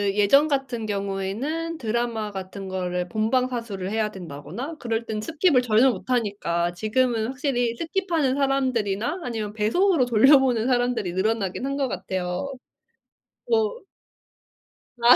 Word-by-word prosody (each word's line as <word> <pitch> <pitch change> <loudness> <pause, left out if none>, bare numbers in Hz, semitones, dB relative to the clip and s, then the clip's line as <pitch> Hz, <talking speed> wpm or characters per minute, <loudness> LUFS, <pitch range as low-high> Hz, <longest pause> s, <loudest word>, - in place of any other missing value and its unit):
예전 275 +9 +5
같은 270 -6 -1
경우에는 205 +12 -3
드라마 230 -3 -2
같은 190 0 -7
거를 180 -1 -2
본방사수를 225 -3 -1
해야 215 -1 0
된다거나 190 - -7
그럴 230 -1 -2
땐 215 -1 -3
스킵을 310 - +2
전혀 245 +2 +4
못 245 - -8
하니까 200 -8 0
지금은 220 +3 +1
확실히 255 -3 -1
스킵하는 325 -3 0
사람들이나 260 - 0
아니면 220 -4 -3
배속으로 270 - +2
돌려보는 245 0 +5
사람들이 245 -7 +1
늘어나긴 200 +3 -1
한 275 0 -2
거 275 -2 0
같아요. 185 +5 -3 1.0
어. 455 0 +1 1.2
아. 245 +2 +9
235 Hz, 315 characters per minute, -24 LUFS, 205-270 Hz, 1.2 s, 아